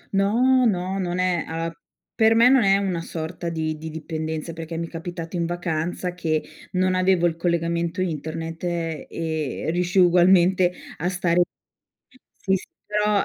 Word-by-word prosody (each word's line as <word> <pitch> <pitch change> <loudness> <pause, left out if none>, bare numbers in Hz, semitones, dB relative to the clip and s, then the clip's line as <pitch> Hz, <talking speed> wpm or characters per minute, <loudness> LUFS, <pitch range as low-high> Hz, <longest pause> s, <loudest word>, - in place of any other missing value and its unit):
No, 250 +6 +4
no. 190 -1 -1
Non 180 -1 -2
è 180 -2 +1
uhm, 165 +1 -3 0.4
per 225 0 +4
me 230 +2 +7
non 265 0 +6
è 195 0 +5
una 185 -4 -1
sorta 170 +1 -5
di 155 -1 -2
di 160 0 -6
dipendenza 160 +1 -4
perché 165 0 -6
mi 170 - -2
è - - -10
capitato 165 0 -6
in 170 - 0
vacanza 175 +1 -2
che 160 -3 -1 0.3
non 185 0 +2
avevo 185 -1 +3
il 165 -2 +1
collegamento 170 +1 -1
internet 165 -1 -3
e 160 -3 -3
riuscii 180 +2 +2
ugualmente 180 +1 +5 0.3
a 175 +4 -1
stare 180 -1 +2 1.0
sì 195 -2 0
s 185 - -5 0.2
però 210 -1 +1
175 Hz, 155 wpm, -23 LUFS, 165-185 Hz, 1.0 s, me